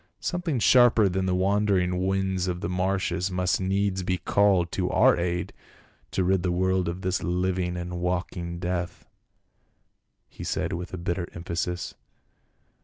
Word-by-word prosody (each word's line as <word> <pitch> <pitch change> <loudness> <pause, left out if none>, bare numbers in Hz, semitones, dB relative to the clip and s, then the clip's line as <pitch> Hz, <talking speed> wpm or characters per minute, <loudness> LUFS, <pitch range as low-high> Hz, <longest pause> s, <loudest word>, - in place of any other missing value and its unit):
" - - -49
Something 175 -5 -1
sharper 120 -1 +5
than 95 0 -1
the 90 - +1
wandering 95 -2 +1
winds 95 -1 0
of 90 0 -3
the - - -2
marshes 90 0 0
must 90 0 0
needs 95 0 0
be 90 0 -1
called 90 -1 +2
to - - -1
our - - +5
aid 85 0 -2 0.6
to 95 - 0
rid 95 0 +2
the 90 - 0
world 95 0 +1
of 90 +2 -5
this 95 0 0
hving 90 0 -1
and 90 0 -5
walking 90 -1 -3
death," 90 0 -3 1.2
he - - -10
said - - -2
with 90 0 -5
bitter 85 0 -2
emphasis. 85 0 -3
90 Hz, 150 wpm, -26 LUFS, 90-95 Hz, 1.2 s, sharper